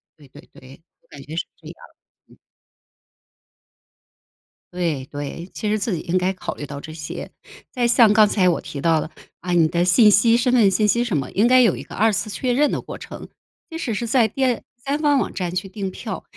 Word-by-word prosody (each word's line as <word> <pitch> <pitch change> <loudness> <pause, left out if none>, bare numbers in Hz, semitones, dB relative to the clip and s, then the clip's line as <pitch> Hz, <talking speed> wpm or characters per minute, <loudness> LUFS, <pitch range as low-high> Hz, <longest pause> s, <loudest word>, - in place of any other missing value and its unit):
对 145 -3 -19
对 - - -14
对， 130 +4 -15 0.2
我 - - -35
感 140 - -12
觉 155 +3 -9
是 - - -2
这 - - -15
样。 - - -10 0.5
嗯。 - - -21 2.4
对 165 -7 -2
对， 145 +4 -6
其 210 - -3
实 215 - +1
自 210 -1 -2
己 165 - -2
应 175 +3 -1
该 185 +1 0
考 185 - -6
虑 145 - -7
到 140 0 -8
这 155 - -9
些， 150 -2 -7 0.4
再 245 -2 0
像 235 -3 +5
刚 210 0 +5
才 185 -3 +2
我 170 - 0
提 140 - -8
到 165 -1 +3
的， - - -4 0.3
啊， 180 - -5
你 165 -2 +4
的 170 +2 0
信 210 +4 +6
息 230 +3 +4
身 245 +1 +1
份 220 -6 +4
信 210 +3 +2
息 235 +3 +2
什 220 -9 -2
么， 135 - -2
应 210 +4 +3
该 255 +1 +6
有 225 -7 +3
一 - - -7
个 - - -13
二 220 +2 +2
次 195 +2 -2
确 245 +4 -2
认 290 +3 +2
的 - - -2
过 - - -9
程。 - - -10 0.4
即 325 - -6
使 240 -8 -3
是 235 +3 -3
在 225 -3 +2 0.5
第 280 +1 -1
方 295 -2 +2
网 - - -2
站 180 -2 -4
去 185 +2 -3
订 195 -1 -5
票， 200 0 -7
195 Hz, 240 characters per minute, -21 LUFS, 170-235 Hz, 2.4 s, 信